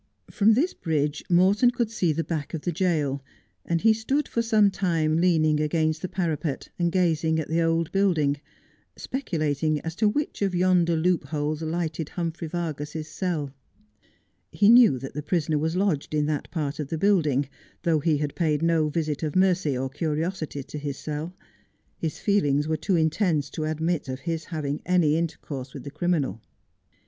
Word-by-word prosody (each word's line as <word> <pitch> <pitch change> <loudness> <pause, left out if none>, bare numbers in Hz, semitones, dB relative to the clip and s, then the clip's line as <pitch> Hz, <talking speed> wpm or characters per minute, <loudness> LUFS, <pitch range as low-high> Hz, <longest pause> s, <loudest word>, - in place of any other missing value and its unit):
From 215 +1 +4
this 320 +9 +1
bridge 150 -3 -1
Morton 190 +7 +5
could 235 -2 -1
see 180 -7 +1
the 165 +2 -1
back 160 -2 -4
of 155 - -5
the 175 - -1
jail, 155 -6 0 0.4
and 170 -1 -1
he 225 0 +5
stood 265 +7 -1
for 235 - -1
some 215 -3 +4
time 165 -5 +1
leaning 160 -3 +3
against 155 +1 0
the - - -2
parapet, 165 -5 -2
and 170 -1 +1
gazing 160 -3 +1
at 155 - -4
the 165 +1 +1
old 165 0 +1
building, 165 -8 +2 0.6
speculating 155 - -1
as 165 - -4
to 215 -1 +3
which 290 +3 -2
of 195 -2 +1
yonder 175 -2 +3
loopholes 155 -2 0
lighted 160 -1 -2
Humphrey 165 -1 -4
Vargas's 155 -2 -4
cell. 155 -6 -3 1.0
He 205 - +4
knew 235 - +7
that 135 +2 -7
the 150 - -4
prisoner 155 -1 0
was 160 +3 -1
lodged 180 -6 0
in 150 -1 +2
that 150 -1 -2
part 150 -3 -3
of 150 - -3
the 160 - -3
building, 155 -8 +2 0.4
though 165 -2 +2
he 155 0 +2
had 145 -1 -2
paid 155 -3 0
no 165 -2 +2
visit 150 -2 -2
of 155 -2 -3
mercy 185 -7 +2
or 130 +1 -1
curiosity 155 +1 -3
to 150 - -7
his 145 -1 -4
cell. 155 +4 -5 0.6
His 160 -2 -3
feelings 150 -8 +1
were 160 - +1
too 180 +5 0
intense 160 -2 +1
to 155 - -3
admit 155 -1 -1
of 130 +1 -5
his 165 0 -3
having 150 -3 -3
any 175 -4 +3
intercourse 145 -5 -4
with - - -7
the 140 - -7
criminal. 145 - -1
160 Hz, 175 wpm, -25 LUFS, 150-180 Hz, 1.0 s, knew